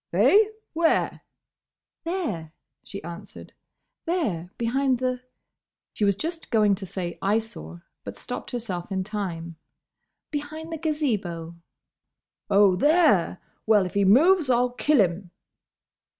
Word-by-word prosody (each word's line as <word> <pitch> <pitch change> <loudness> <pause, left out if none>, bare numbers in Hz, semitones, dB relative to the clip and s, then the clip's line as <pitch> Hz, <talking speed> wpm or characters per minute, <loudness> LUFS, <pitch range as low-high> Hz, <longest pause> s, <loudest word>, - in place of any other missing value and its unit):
"Eh? 425 +2 +6 0.3
Where?" 330 0 +1 0.8
"There," 220 - -3 0.3
she 200 - -8
answered, 170 +5 -10 0.5
"there, 220 - -1
behind 260 +2 +1
the—" 255 0 -2 0.7
she - - -3
was 200 -1 +3
just 325 - -5
going 210 -3 +4
to 195 0 -5
say 175 -2 -5
"Eyesore," 195 - -2 0.2
but - - -8
stopped - - -6
herself 205 -7 -4
in 190 -1 -1
time. 175 -5 -5 0.7
"Behind 310 +2 -5
the 325 - -4
Gazebo." 210 - -2 1.0
"Oh, 200 -2 +5
there! 290 - +3 0.3
Well, 210 -3 +5
if 180 - -6
he 200 - +2
moves 300 - +5
I'll 245 0 +3
kill 285 +3 +2
him!" 180 0 -1
215 Hz, 120 wpm, -25 LUFS, 185-295 Hz, 1.0 s, Eh